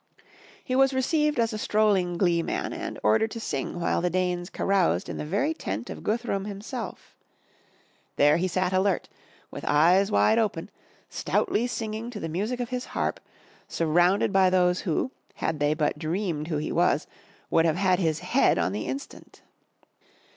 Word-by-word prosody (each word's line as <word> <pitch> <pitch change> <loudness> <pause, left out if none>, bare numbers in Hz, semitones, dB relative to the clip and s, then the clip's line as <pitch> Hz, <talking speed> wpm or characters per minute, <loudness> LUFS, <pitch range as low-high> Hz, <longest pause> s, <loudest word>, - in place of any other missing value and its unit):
He 255 - -2
was 270 0 +4
received 300 +3 +1
as 230 -1 +1
a 215 - -4
strolling 200 -5 +1
glee 170 -2 +2
man - - -3
and - - -5
ordered 110 - +3
to 230 - -6
sing 155 -5 -3
while 170 - 0
the 180 - +1
Danes 180 0 -1
caroused 185 - +1
in - - -5
the - - -4
very 205 - 0
tent - - -5
of - - -8
Guthrum 215 -3 -1
himself. 210 +1 -7 1.0
There 150 +2 +4
he 180 +2 0
sat 185 +1 -1
alert, 190 0 +1 0.4
with - - -8
eyes 175 +7 +4
wide 105 - +3
open, 220 -2 -2 0.4
stoutly 245 - 0
singing 225 -1 -4
to 230 -4 -7
the 165 - -4
music 210 +10 -2
of 245 -1 -3
his 250 0 -3
harp, - - -1 0.5
surrounded 175 +5 +2
85 - - -9
MY 195 - +4
BOOK - - +5
HOUSE 185 - +4
by 185 - +3
those 180 0 +2
who, 190 +9 -1 0.2
had 160 -2 -2
they 145 +1 +2
but 150 -1 -1
dreamed 165 -1 -2
who 160 -3 -1
he 150 - -3
was, 170 -4 +2 0.5
would 165 0 +4
have 160 0 +1
had 185 -1 +2
his 160 -4 0
head - - +2
on 85 +2 +1
the 105 +2 -4
instant. 275 - -8
185 Hz, 185 wpm, -26 LUFS, 165-220 Hz, 1.0 s, BOOK